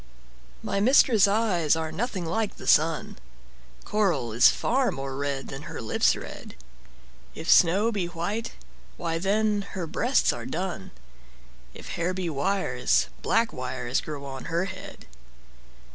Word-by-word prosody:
MY 200 - -1
mistress' 225 -2 +5
eyes 200 -7 +2
are 160 -1 -3
nothing 205 -5 -3
like 205 +5 -2
the - - -11
sun; 155 0 +2 0.7
Coral 190 - 0
is 115 - +7
far 260 +1 +1
more 135 0 -5
red 140 -1 -3
than 135 +2 -8
her - - -6
lips' 110 - +2
red; - - -9 0.8
If 160 - -7
snow 195 +7 +5
be 195 -5 -2
white, 190 +7 -4 0.4
why 165 -1 -2
then 205 +2 +1
her 180 -3 -3
breasts 245 - +1
are - - -6
dun; 175 - -4 0.9
If - - -10
hairs 175 +2 -2
be 180 -3 -2
wires, 140 - +1
black 230 - +1
wires 125 0 -2
grow 145 -2 -7
on 135 -1 -7
her 170 +3 -1
head. 185 -1 -9
175 Hz, 140 wpm, -26 LUFS, 145-205 Hz, 0.9 s, is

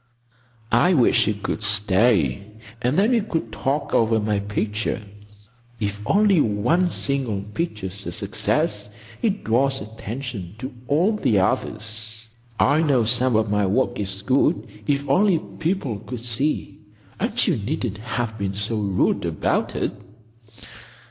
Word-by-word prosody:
"I 180 0 +4
wish 120 -4 +4
you 105 - +1
could 105 +2 -4
stay, 100 - +3 0.4
and 125 +4 +1
then 210 +5 +4
we 235 -2 +3
could 165 - -3
talk 135 +8 -2
over 115 0 +3
my 105 -1 0
picture. 105 +2 -2 0.8
If 105 -1 -3
only 200 -4 +4
one 125 - +2
single 130 - -2
picture's 105 - -5
a - - -3
success, 105 0 -1 0.3
it 210 -3 0
draws 135 +4 +2
attention 110 -2 -6
to 130 +4 -6
all 165 +9 +3
the 115 - +2
others. 110 +3 -2 0.3
I 145 +3 +4
know 140 -7 +3
some 125 +2 +2
of 110 -1 +2
my 105 -1 +2
work 120 +4 +1
is 95 -1 -4
good, 135 +8 +2 0.2
if 140 -1 0
only 185 +5 +4
people 155 - -3
could 125 +1 -7
see. 125 +6 -1 0.4
And - - -2
you - - +2
needn't 110 -2 -3
have 115 -1 -3
been 100 -1 -2
so 105 +2 -1
rude 100 -3 +1
about - - 0
it." - - 0
115 Hz, 140 wpm, -23 LUFS, 105-140 Hz, 0.8 s, I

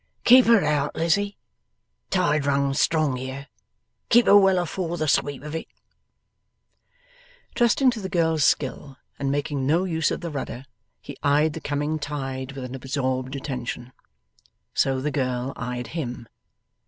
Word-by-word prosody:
'Keep 250 +1 +7
her 230 -4 +6
out, 150 -1 0
Lizzie. 200 +5 0 0.7
Tide 150 -6 +1
runs 140 0 +1
strong 155 -5 +1
here. 130 +2 -6 0.6
Keep 240 0 +6
her - - +6
well 195 -2 +6
afore 175 0 -2
the 155 - -1
sweep 145 -1 0
of 150 0 -7
it.' 160 - -4 1.9
Trusting 245 +2 +3
to 230 -3 -6
the 190 - -5
girl's 160 -4 +1
skill 135 -1 0 0.2
and 140 -1 -1
making 145 -1 -2
no 165 +5 +3
use 160 -4 0
of - - -3
the 170 -2 -5
rudder, 135 -2 -5 0.4
he 140 - -10
eyed 145 +2 +2
the - - -7
coming 145 +2 -2
tide 135 -2 -5
with 135 -1 -7
an 125 0 -7
absorbed 130 0 -2
attention. 125 -2 -5 0.8
So 135 -1 +1
the 150 +2 -1
girl 130 -2 -2
eyed 125 -1 -5
him. 125 -8 -5
145 Hz, 150 wpm, -24 LUFS, 130-165 Hz, 1.9 s, Keep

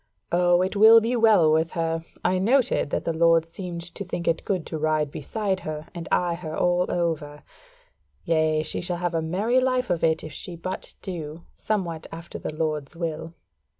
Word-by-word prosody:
O, 175 0 +4
it 190 +3 -2
will 220 +2 +8
be 230 +3 -1
well 215 -9 +5
with 160 +1 +1
her: 165 -1 -1 0.2
I 185 0 +2
noted 240 - +2
that - - -2
the 165 - 0
Lord 165 0 +4
seemed 170 0 -6
to - - -5
think 175 -2 -5
it 165 - +1
good 185 -5 -2
to 160 - -5
ride 155 -1 +1
beside 195 +6 -2
her, 155 -2 -6
and 170 -2 -7
eye 175 -1 +2
her 165 -2 -6
all 180 0 +2
over. 160 -4 -2 0.8
Yea, 155 -1 +2
she - - -3
shall 180 -1 -2
have 175 0 -2
a 165 - 0
merry 200 +10 +1
life 255 -4 0
of 170 - -1
it 160 -1 +2
if 155 - -8
she 175 - -6
but 185 +3 -6
do 165 -3 -6
somewhat 175 -7 -3
after 165 +1 -8
the 155 - -4
Lord's 155 -2 -2
will." 165 -1 -4
170 Hz, 190 wpm, -25 LUFS, 160-185 Hz, 0.8 s, will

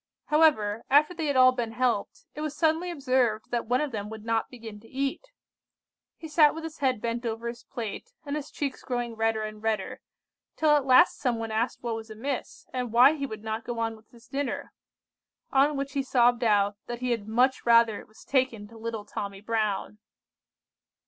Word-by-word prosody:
However, 235 -9 +3
after 300 +5 +5
they 325 -3 -3
had 285 - 0
all 255 0 +7
been 240 -3 -3
helped, 240 -4 -1
it 300 - -7
was 305 -1 -4
suddenly 325 +2 +1
observed 255 -8 0
that 235 -2 -1
one 250 +3 +2
of 300 -2 -2
them 210 -2 -4
would 220 0 -9
not 225 -1 0
begin 225 -4 -10
to 225 - -17
eat. 275 - -2 0.9
He 320 - -8
sat 305 -1 +5
with 325 - -6
his 325 -1 -7
head 260 -4 +1
bent 235 +1 -2
over 230 0 -3
his 235 0 -7
plate, 235 - -6
and 285 0 -3
his 300 -2 -5
cheeks 280 -3 -4
growing 245 -2 -3
redder 225 -1 0
and 215 0 -7
redder, 220 +3 -2 0.5
till 310 -1 +3
at 290 -2 +3
last 305 +8 +6
some 250 -4 0
one 225 -1 -4
asked 225 +4 -1
what 235 -1 -2
was 225 0 -8
amiss, 250 +5 -5
and 250 -3 -2
why 250 +5 +7
he 280 -3 -3
would 220 -3 -8
not 220 +1 -3
go 240 0 -5
on 225 -1 -1
with 220 0 -20
his 235 -1 -19
dinner, 280 0 -3 0.8
on 280 +2 +3
which 275 0 -3
he 280 - +1
sobbed 245 -2 +3
out 205 -2 +3
that 240 0 -5
he 250 -1 0
had 220 -3 -2
'much 250 +4 +2
rather 230 -2 +5
it - - -13
was 215 - -17
taken 255 -6 0
to 225 0 -13
little 225 -2 -5
Tommy 200 -2 -5
Brown! 215 -1 -2
240 Hz, 205 wpm, -27 LUFS, 220-275 Hz, 0.9 s, all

